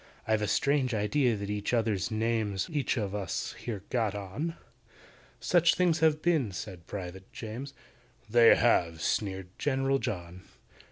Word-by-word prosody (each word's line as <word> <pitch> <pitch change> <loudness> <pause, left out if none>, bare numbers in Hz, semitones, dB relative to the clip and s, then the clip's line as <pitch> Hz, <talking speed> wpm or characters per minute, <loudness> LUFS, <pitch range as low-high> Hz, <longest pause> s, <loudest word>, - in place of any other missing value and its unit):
"I've 110 -1 +2
a 105 - 0
strange 140 0 +1
idea 120 +4 +2
that 100 0 -4
each 105 +3 -1
other's 110 -5 0
names 110 -3 -1
We've 155 - -4
each 135 -1 0
of 100 -3 -2
us 100 -3 -3
here 105 -6 -5
got 110 -5 0
on. 105 - -4 0.8
Such 175 -2 +4
things 175 -3 +2
have 155 -1 +3
been," 155 - +2
said 90 -2 -7
PRIVATE 95 -1 -7
JAMES. 125 +5 -7 0.5
"They 115 +1 +7
have!" 85 -8 +2
sneered 95 -3 -1
GENERAL 135 -1 +1
JOHN. 90 -4 -5
110 Hz, 150 wpm, -29 LUFS, 100-135 Hz, 0.8 s, They